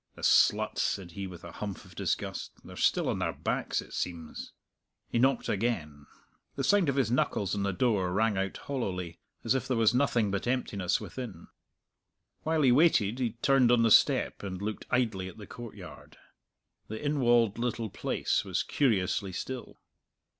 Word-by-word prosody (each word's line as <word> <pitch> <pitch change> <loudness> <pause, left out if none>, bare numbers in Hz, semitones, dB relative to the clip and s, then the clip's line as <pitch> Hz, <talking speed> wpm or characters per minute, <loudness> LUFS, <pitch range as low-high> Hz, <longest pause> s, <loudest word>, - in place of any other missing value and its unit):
"The - - -12
sluts!" 110 +1 +4
said 95 -4 -2
he, 95 +3 -5
with 90 -2 -11
a - - -8
humph 100 -3 -6
of - - -15
disgust; - - -3
"they're - - -11
still - - +2
on - - -1
their - - -1
backs, - - -2
it - - -15
seems." 85 -3 -5 0.6
He 115 - -1
knocked 130 0 +2
again. 80 -10 -2 0.5
The - - -2
sound 200 -6 +3
of 140 - 0
his 135 -4 +1
knuckles 105 -5 0
on 100 - -1
the 100 0 0
door 95 -2 +1
rang 110 +2 +2
out 95 0 -2
hollowly, 90 -11 -4 0.2
as 115 - +2
if 135 - -1
there 125 - 0
was 115 -1 +4
nothing 120 -5 +2
but 100 +4 -2
emptiness 105 -8 0
within. 115 -10 -8 0.9
While 160 -1 +1
he 130 - +6
waited 125 -6 +4
he 120 -4 -1
turned 135 -3 +5
on 120 -1 +4
the 115 - +3
step - - +4
and 95 -2 -5
looked 105 +2 -5
idly 110 -7 0
at 95 - -10
the 105 - -9
courtyard. 120 0 -11 0.7
The 110 - -5
inwalled 120 -7 +2
little 115 -3 -2
place - - -1
was - - -1
curiously 100 -7 +1
still. 125 +7 -6
110 Hz, 175 wpm, -29 LUFS, 95-125 Hz, 0.9 s, he